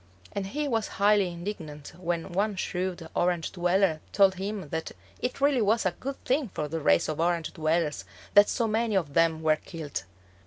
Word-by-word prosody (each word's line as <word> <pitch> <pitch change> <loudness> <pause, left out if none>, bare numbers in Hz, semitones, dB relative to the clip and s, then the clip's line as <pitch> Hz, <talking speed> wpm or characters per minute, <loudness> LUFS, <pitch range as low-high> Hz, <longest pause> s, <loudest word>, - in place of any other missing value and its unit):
And 195 -1 -3
he 295 +8 -2
was 225 -5 0
highly 200 -2 +4
indignant 170 -5 -7
when 175 0 -3
one 200 +3 0
shrewd 180 -2 -3
Orange 175 -2 +1
dweller 175 -2 +2
told 195 -1 +5
him 195 -2 -5
that 160 +1 -4 0.3
it 250 - -3
really 280 -3 +3
was 215 +1 +2
a 185 - +3
good 270 +10 -5
thing 265 -2 +1
for 150 - -2
the 165 +2 -3
race 85 - +3
of 155 -1 -3
Orange 170 -1 0
dwellers 155 - 0 0.3
that 205 0 +7
so 235 - +1
many 220 0 0
of 160 -7 0
them 165 0 +3
were 155 -1 +4
killed. 155 - -6
180 Hz, 185 wpm, -28 LUFS, 160-210 Hz, 0.3 s, that